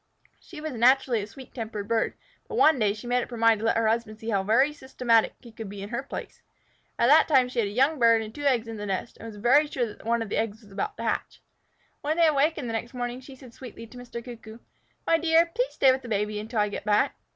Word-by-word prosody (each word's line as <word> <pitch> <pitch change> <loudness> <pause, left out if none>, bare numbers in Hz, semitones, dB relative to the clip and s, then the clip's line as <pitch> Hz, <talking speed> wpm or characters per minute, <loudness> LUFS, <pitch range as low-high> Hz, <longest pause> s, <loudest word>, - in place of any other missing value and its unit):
She 340 -5 -12
was 310 0 -5
naturally 250 -1 +3
a 200 - -6
sweet 255 +4 -13
tempered 220 -4 -5
bird, 230 -1 0 0.3
but - - -6
one 310 -4 +5
day 210 -2 +2
she 215 - -11
made 245 +1 +1
up - - -6
her 240 - -7
mind 225 -1 +4
to 225 - -1
let 225 - +2
her 230 -1 +2
husband 220 -1 -1
see 225 +1 -7
how 195 -2 +1 0.3
systematic 250 -5 +1
he 235 - -13
could 220 -2 -8
be 200 0 -7
in 200 - -7
her 240 +3 -2
place. 275 - -8 0.6
At - - +2
that 300 +6 +6
time 265 -5 +4
she 250 -1 -4
had 215 - +1
a - - -5
young 270 +7 +2
bird 230 -1 +4
and 215 0 -9
two 290 - -9
eggs 255 -5 +1
in 225 -1 -6
the 205 0 -5
nest, 195 +4 -4
and 230 - -9
was 220 - -9
very 255 +8 +4
sure 255 -4 -1
that - - -17
one 230 0 0
of 220 - -9
the - - -2
eggs 220 0 -3
was 205 - -18
about 420 - -4
to - - -6
hatch. - - -2 0.6
When 305 +3 -1
they 340 - +5
awakened 300 -2 +1
the 230 - -4
next 235 +3 -4
morning, 245 +1 -4
she 265 +1 -12
said 255 -3 -15
sweetly 230 -2 -10
to 240 +2 -14
Mr. 235 -1 -8
Cuckoo, 225 -3 -10 0.5
"My 330 - +3
dear, 330 +1 +4
please - - -1
stay 265 - +5
with 260 0 -1
the 245 - -10
baby 210 0 -1
until 220 +1 -2
I 210 - +1
get - - -6
back." 210 0 +2
235 Hz, 270 wpm, -26 LUFS, 220-265 Hz, 0.6 s, that